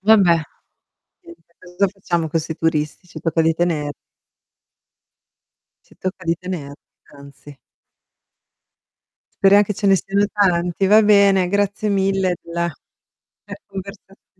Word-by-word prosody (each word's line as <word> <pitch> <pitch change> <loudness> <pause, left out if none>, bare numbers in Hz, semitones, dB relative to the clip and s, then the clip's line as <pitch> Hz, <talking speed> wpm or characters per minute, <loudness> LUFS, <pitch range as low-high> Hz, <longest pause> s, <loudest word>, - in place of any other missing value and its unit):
Vabbè. 195 -5 +4 0.8
Niente, 340 - -17
cosa 185 +2 -1
facciamo 175 -4 -3
con 165 +2 -1
'sti 160 0 -6
turisti? 160 +1 -2
Ci - - -10
tocca 165 0 0
di 165 0 +2
tener 160 -4 -1 1.9
Ci - - -23
tocca 185 0 -5
di 165 0 +1
tener 175 -6 -6 0.4
anzi. 140 0 -14 1.9
Speriam 200 +1 +6
che 210 - -4
ce 200 - -2
ne 195 -1 +5
siano 200 +2 0
tanti, 180 -2 +1
va 215 +3 +6
bene 200 -3 +4
grazie 205 +2 -1
mille 195 -2 0
della 170 0 -3 0.7
della - - -10
conversazio 195 0 -11
185 Hz, 120 wpm, -20 LUFS, 165-200 Hz, 1.9 s, Speriam